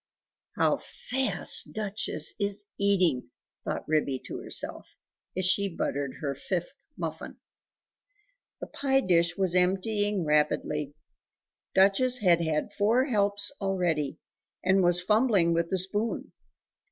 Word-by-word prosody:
"How - - +2
fast 265 +1 -1
Duchess 215 -1 -1
is 205 0 -2
eating!" 180 - +2 0.3
thought - - -4
Ribby 150 -3 +1
to - - -6
herself, - - -3 0.4
as 185 - +1
she 200 +2 +4
buttered 140 -5 -3
her 140 -2 -2
fifth - - -4 0.2
muffin. - - -6 1.2
The - - -3
pie 270 -1 0
dish 170 -5 +2
was 190 -3 0
emptying 195 +2 +1
rapidly! 150 -1 0 0.8
Duchess 200 +7 +4
had 175 -6 +3
had 160 +5 -1
four 220 +6 +2
helps 205 -4 +1
already, 175 -7 -1 0.5
and 190 +1 +3
was 175 -1 +4
fumbling 205 -3 +2
with 170 0 0
the 190 - 0
spoon. 205 +5 -2
190 Hz, 115 wpm, -28 LUFS, 170-205 Hz, 1.2 s, she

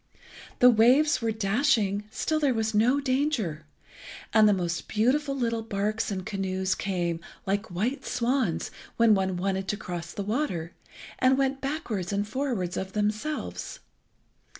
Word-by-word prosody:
The 250 0 +7
waves 255 +5 +4
were 230 - 0
dashing, 215 -1 +1
still 310 +7 -1
there 280 -5 +2
was 220 0 0
no 240 +6 +3
danger, 255 - -1 0.7
and 215 -1 +6
the - - +5
most 175 -4 -2
beautiful 275 +6 +1
little 230 -3 0
barks 215 0 -2
and 190 -3 -4
canoes 190 -2 -1
came, 175 -3 -2 0.3
like 200 +3 -1
white 215 +11 -2
swans, 245 -6 0 0.3
when 230 -2 +6
one 190 -2 0
wanted 190 +1 -1
to 210 - -1
cross 175 -3 -6
the 200 - -4
water, 205 - -2 0.5
and 260 +1 +4
went 270 0 0
backwards 245 - -3
and 205 +1 -1
forwards 220 -8 -2
of 190 0 -4
themselves. 215 +9 -3
215 Hz, 145 wpm, -27 LUFS, 190-255 Hz, 0.7 s, The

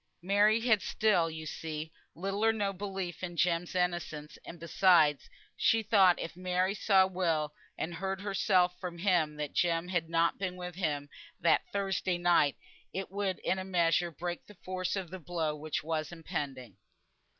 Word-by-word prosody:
Margaret 210 +4 +3
had 220 -5 +4
still, 185 -4 +2
you 160 0 -7
see, 155 0 -5 0.2
little 195 +4 -2
or 225 - +5
no 205 -3 -1
belief 190 -2 -5
in 175 -2 -5
Jem's 175 +1 +1
innocence; 175 -4 -2
and 170 - -10
besides, 170 -3 +3 0.3
she 225 0 +3
thought 195 -4 +5
if 165 - -5
Mary 185 +1 0
saw 195 -2 +4
Will, 165 -5 -1 0.2
and 170 - -3
heard 190 +3 -3
herself 190 -3 +2
from 175 -2 -6
him 170 -5 +2
that 150 -1 -4
Jem 170 0 +1
had 170 -3 -1
not 165 0 +2
been 185 -2 -2
with 180 -1 -6
him 150 -5 -2 0.3
that 170 - +2
Thursday 195 -2 -1
night, 175 -5 +3 0.3
it 190 -1 -5
would 195 -2 -1
in 190 - 0
a - - -3
measure 175 -2 +2
break 175 +2 -5
the 210 - -15
force 185 0 -2
of 185 -4 -4
the 185 - -6
blow 160 -2 -2
which 150 0 -3
was 155 0 -2
impending. 135 - -5
180 Hz, 170 wpm, -31 LUFS, 165-190 Hz, 0.3 s, or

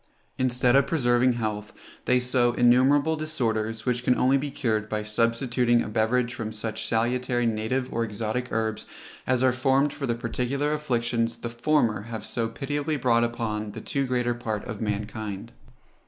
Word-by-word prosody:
Instead 125 0 +2
of 140 - +4
preserving 125 -4 +3
health, 110 -2 -3 0.3
they 125 0 +3
sow 125 -1 +2
innumerable 130 +6 +4
disorders, 115 -8 -2
which 125 -1 0
can 125 - +3
only 130 +2 +3
be 140 +1 -1
cured 110 -5 -1
by 105 0 -2
substituting 115 +2 +1
a - - -6
beverage 115 +3 +1
from 110 -2 -5
such 110 0 -4
salutary 120 +1 0
native 115 +3 -1
or 115 - 0
exotic 110 +3 -3
herbs 110 -1 -2 0.4
as 130 0 +2
are 130 -1 +4
formed 135 +3 +2
for 140 -2 -4
the 120 - 0
particular 125 +5 -1
afflictions 120 -5 -1
the 120 - -5
former 120 -3 +1
have 115 -1 -5
so 115 -1 -1
pitiably 145 +5 -2
brought 120 -3 +3
upon 110 -3 -3
the - - -7
too 140 -2 -2
greater 125 -1 0
part 110 -3 -4
of 110 -3 -6
mankind. 105 -1 -4
120 Hz, 165 wpm, -26 LUFS, 110-130 Hz, 0.4 s, of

